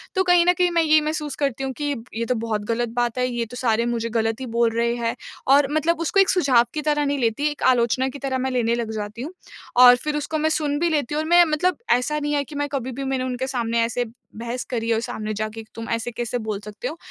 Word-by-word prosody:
तो 380 - +3
कहीं 355 -1 +4
न 355 - +5
कहीं 360 0 +1
मैं 335 -1 +3
ये 310 0 +5
महसूस 300 -2 -3
करती 270 -1 -1
हूँ 265 - -2
कि 290 -1 0 0.2
ये 230 +1 -1
तो 250 - 0
बहुत 220 -2 -2
ग़लत 240 +1 -1
बात 240 -1 0
है। 250 0 +1
ये 240 -1 -2
तो 245 +2 -10
सारे 235 -2 +1
मुझे 230 -1 -2
ग़लत 225 0 -1
ही - - -3
बोल 235 -1 +3
रहे 235 0 +2
हैं 230 -1 -2 0.4
और 285 -1 +4
मतलब 320 +2 +1
उसको 335 +4 +1
एक 390 - +5
सुझाव 275 -10 +4
की 305 - -1
तरह 295 -1 +1
नहीं 285 0 0
लेती, 235 +4 0
एक 295 - -8
आलोचना 255 +1 +3
की 280 - -9
तरह 265 -1 -2
मैं 260 +1 -1
लेने 235 -2 +1
लग 235 -2 -3
जाती 215 +1 -5
हूँ 295 +6 -5 0.5
और 245 0 +9
फ़िर 295 +4 -3
उसको 305 +2 -2
मैं 310 +1 +2
सुन 300 -2 0
भी 340 +1 +2
लेती 295 -3 -1
हूँ 305 - +1
और 315 - -5
मैं 350 0 +7
मतलब 330 +4 +1
ऐसा 300 +5 +2
नहीं 295 0 -2
है 285 -1 +1
कि 295 - -11
मैं 290 0 -1
कभी 260 -2 -2
भी 270 +3 -5
मैंने 265 -1 -1
उनके 255 0 -3
सामने 235 -3 0
ऐसे 240 +1 -2 0.3
बहस 235 +2 -4
करी 230 -2 -2
है - - +4
और 220 - -1
सामने 215 -2 -4
जाके 215 +1 -4
तुम 230 0 -6
ऐसे 230 +1 -2
कैसे 240 +1 -3
बोल 220 -3 -4
सकते 210 0 -6
हो। 320 - -6
255 Hz, 270 wpm, -23 LUFS, 230-295 Hz, 0.5 s, और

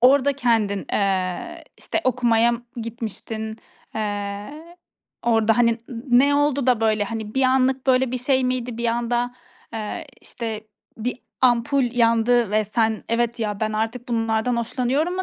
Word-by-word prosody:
Orada 275 +2 +5
kendin, 225 -7 +1
eee, 195 - -1
işte - - -2
okumaya 235 -2 +3
m 235 - -2 0.2
gitmiştin, 220 -1 -5 0.4
eee, 210 +10 -5 0.5
orada, 225 -1 +3
hani, 235 -1 +5 0.2
n 245 0 +1
ne 285 - +3
oldu 285 -2 +2
da 245 -3 +3
böyle 215 -2 +2
hani 220 0 -5
bir 265 - +2
anlık 260 0 +2
böyle 255 -1 +3
bir 255 - -1
şey 260 +1 +1
miydi? 250 -2 -2
Bir 235 - 0
anda, 240 +1 0 0.4
eee, 225 +10 -5
işte 220 -2 -6 0.3
bir 245 +3 -3 0.2
ampul 255 +2 +3
yandı 230 -1 +3
ve 215 +1 +2
sen 220 +1 0
“Evet, 235 +1 0
ya 210 -2 -2
ben 215 0 0
artık 225 +3 -2
bunlardan 225 +1 0
hoşlanıyorum." 255 +8 0
mu 375 - 0
235 Hz, 150 wpm, -23 LUFS, 220-255 Hz, 0.5 s, Orada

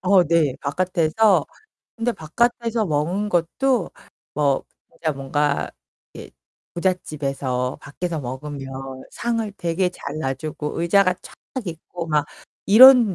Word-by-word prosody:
어 185 -1 +5
네. 155 -5 +2
바깥에서. 180 +3 +2 0.5
근데 235 +1 0
바깥에서 230 +5 0
먹은 170 +7 0
것도 205 +6 +1 0.4
뭐 140 -2 +1 0.3
진짜 160 -2 -2
뭔가 140 +1 -1 0.4
이 - - -10 0.4
부잣집에서 140 -8 -2
밖에서 165 +3 -4
먹으면 135 +2 -6 0.4
상을 230 -3 -2
되게 175 +1 0
잘 150 -4 -7
놔 135 -3 -1
주고 150 +2 -5
의자가 185 +2 +4
쫙 - - -12 0.3
있고 170 0 -6
막 150 -2 +2 0.4
이런 240 0 +9
170 Hz, 230 characters per minute, -22 LUFS, 145-200 Hz, 0.5 s, 이런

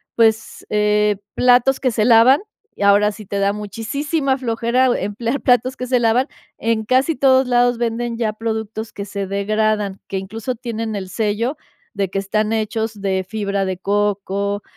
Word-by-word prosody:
pues, 220 -1 +1
eh, 210 -1 +2 0.2
platos 250 +1 +4
que 255 - +1
se 215 -1 0
lavan. 240 +3 +6 0.4
Y - - -11
ahora 205 +1 +5
si 215 0 -11
te 200 - -3
da 200 0 +2
muchisísima 265 - -2
flojera 235 +1 +1
emplear 230 +6 -2
platos 255 0 +2
que 250 - -4
se 250 -1 +2
lavan, 235 +3 +2 0.3
en 225 -1 0
casi 260 +7 +2
todos 265 -1 +4
lados 245 -1 +3
venden 235 0 -2
ya 220 -2 -1
productos 220 0 -4
que 200 - -6
se 200 -1 -4
degradan, 205 0 0
que, 195 - -3
incluso, 220 +6 -4
tienen 225 -2 -4
el 190 -2 -5
sello 220 +7 -1 0.4
de 195 -2 -1
que 195 - -4
están 215 +2 -1
hechos 220 -1 -2
de 190 -1 -1
fibra 200 -2 -2
de 190 -1 -3
coco, 200 0 -1
220 Hz, 165 wpm, -19 LUFS, 205-240 Hz, 0.4 s, lavan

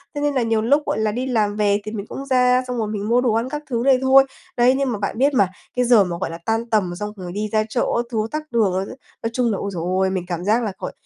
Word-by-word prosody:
thế 290 - -2
nên 290 0 +1
là 260 - +1
nhiều 225 -1 +1
lúc, 280 +7 +3
gọi - - -1
là, 215 -1 +1
đi 245 +4 -3
làm 215 -5 +1
về 205 -1 +2
thì 215 - -5
mình 205 -2 -5
cũng 275 - -7
ra, 250 -1 +3
xong 250 -1 -3
rồi 220 -2 -1
mình 210 0 -4
mua 245 +1 +4
đồ 245 -3 +1
ăn 230 +3 0
các 295 +2 -5
thứ 235 -2 -1
đây 265 -1 +4
thôi. 265 +1 +6 0.3
Đấy, 245 +1 +5
nhưng 275 -2 0
mà 215 - -3
bạn 200 +1 -3
biết 280 +4 +3
mà, 200 -7 +4 0.3
cái 250 0 +2
giờ 235 -4 +6
mà, 175 -2 -4
gọi - - -1
là, 165 - -6
tan 225 +1 -1
tầm 200 -6 +1
xong 210 +3 -5
rồi 180 -3 -7
đi 210 +3 -3
ra 215 -1 +2
chợ 240 - 0
các 235 - 0
thứ 230 - -2
tắc 305 0 -5
đường 220 -6 +2
á 185 - 0
chứ, - - -9 0.3
nói 225 - 0
chung 240 -1 +1
là, 200 - -1
ôi, 200 - -3
trời 170 - -4 0.2
ơi, 190 - +2
mình 190 -2 -2
cảm 175 -1 -4
giác 220 +4 +2
là 215 - -2
gọi - - -4
225 Hz, 320 wpm, -21 LUFS, 205-250 Hz, 0.3 s, thôi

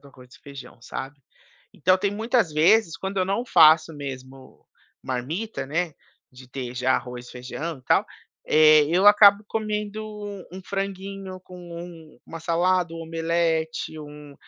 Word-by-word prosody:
do 140 - -16
arroz 125 -1 -18
e - - -18
feijão, 140 -4 -12
sabe. 135 +3 -7 0.5
Então 185 +4 +2
tem 200 +1 0
muitas 220 -2 0
vezes, 170 +4 +3
quando 190 0 -4
eu 185 - +1
não 200 +6 -1
faço 160 -5 +5
mesmo 135 -2 -10 0.4
marmita, 150 - -4
né, 165 +3 -2 0.4
de 125 0 -15
ter 125 -1 -6
já 125 +1 +1
arroz, 125 -1 -7
feijão 135 +5 -6
e 130 - -21
tal, - - +2 0.4
eh, 155 -1 +6
eu 185 +5 +2
acabo 205 0 +7
comendo 215 -1 -3 0.5
um 190 - -8
franguinho 195 -1 -5
com 180 0 -14
um 170 -4 -11
uma 165 - -8
salada, 175 +1 +1
um - - -7
omelete, 165 -1 -1
um 150 -1 -11
165 Hz, 150 wpm, -24 LUFS, 140-190 Hz, 0.5 s, acabo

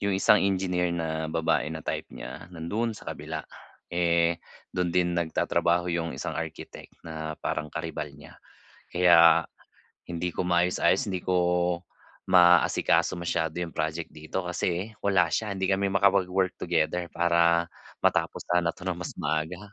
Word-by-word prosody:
'yong 100 -1 0
isang 105 +2 +5
engineer 90 -2 +1
na 80 -2 -2
babae 80 -2 0
na 80 -1 -7
type - - -3
niya, 85 - -9
nandoon 105 +7 -3
sa - - -9
kabila. - - -6 0.5
Eh, 85 -1 +2 0.3
dun 90 -1 0
din 90 -1 +2
nag-tatrabaho 85 +1 +1
'yong 85 -1 -2
isang - - -4
architect - - -7
na 80 -1 -5
parang 75 0 -2
karibal 80 -1 -5
niya. 75 +1 -15 0.5
Kaya, 85 -2 +6 0.6
hindi 85 +1 -3
ko 90 - -1
maayos-ayos, 90 +7 +2
hindi 90 - -2
ko 90 - 0 1.0
maasikaso 90 0 +4
masyado 80 -2 -1
'yong 85 -2 -5
project 80 +1 -2
dito 80 +5 -4
kasi 90 +4 -2
wala 95 -3 +3
siya, 105 -2 -1
hindi 95 0 -1
kami 100 +1 +1
makapag-work 95 -1 +2
together 85 +3 0
para 85 0 +3 0.4
matapos - - +1
sana 85 -1 +2
'to 90 - -12
nang 90 - -1
mas 90 - -5
maaga. 80 +4 -2
85 Hz, 145 wpm, -27 LUFS, 80-90 Hz, 1.0 s, Kaya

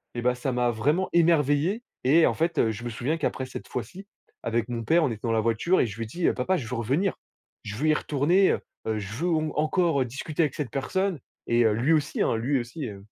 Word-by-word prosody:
et 120 - -2
bah 125 0 +3
ça 125 +2 -2
m'a 125 -1 +1
vraiment 150 - +1
émerveillé. 165 - +3 0.2
Et 155 +6 +5
en - - +2
fait, 165 +1 -1
heu, 110 - +3
je 110 +2 -7
me 120 - -3
souviens 130 +8 -2
qu'après 135 -3 -2
cette 130 - -8
fois-ci, 150 - -6 0.3
avec 115 0 -1
mon 120 -1 -3
père 165 +9 +3
on 140 - +2
était 110 -2 -6
dans 115 - +1
la 110 - +2
voiture 115 +12 +2
et - - +3
je 105 -1 -8
lui 115 - -3
dis: 170 +10 -1
«Papa 135 +9 +1
je 120 -8 -5
veux 125 - -4
revenir, 135 - 0 0.5
je 105 -1 -6
veux 150 +8 -1
y - - +5
retourner, 155 +7 +2
heu - - -1 0.3
heu, 110 -1 0
je 105 0 -5
veux 160 +10 -2
au 165 -3 +2
m 155 -1 -2
encore 155 -2 +2
discuter 135 +6 -3
avec 150 - -1
cette 145 -7 -4
personne 185 +6 -1 0.3
et, 120 0 +3
heu, 110 - +4
lui 125 +9 +2
aussi 150 -2 0
hein - - +1
lui 130 +4 +1
aussi 125 +4 -5
heu» 100 -2 -9
135 Hz, 250 wpm, -26 LUFS, 115-165 Hz, 0.5 s, Et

